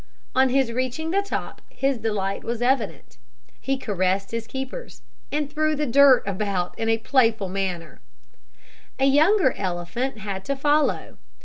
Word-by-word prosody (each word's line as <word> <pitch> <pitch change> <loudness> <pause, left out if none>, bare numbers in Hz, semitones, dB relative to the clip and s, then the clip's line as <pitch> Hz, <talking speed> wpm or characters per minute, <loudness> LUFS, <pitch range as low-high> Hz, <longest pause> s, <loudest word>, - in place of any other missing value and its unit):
On 260 0 +4
his 260 -2 +2
reaching 255 +6 -2
the 395 +2 +2
top 400 - -5
his 270 -2 -1
delight 205 -3 -2
was 235 0 -3
evident. 235 - -1 0.4
He 270 0 -1
caressed 195 -4 -1
his 230 -1 -4
keepers, 265 - -7 0.3
and 295 0 -1
threw 310 +1 0
the 300 +1 -1
dirt 275 0 +6
about 195 -2 -2
in 225 - 0
a 225 - +3
playful 225 -4 +2
manner. 185 -3 -4 1.0
A 270 - +2
younger 310 +4 +4
elephant 185 +7 -3
had 195 -2 -5
to 275 - -1
follow. 295 +2 0
240 Hz, 145 wpm, -24 LUFS, 195-275 Hz, 1.0 s, dirt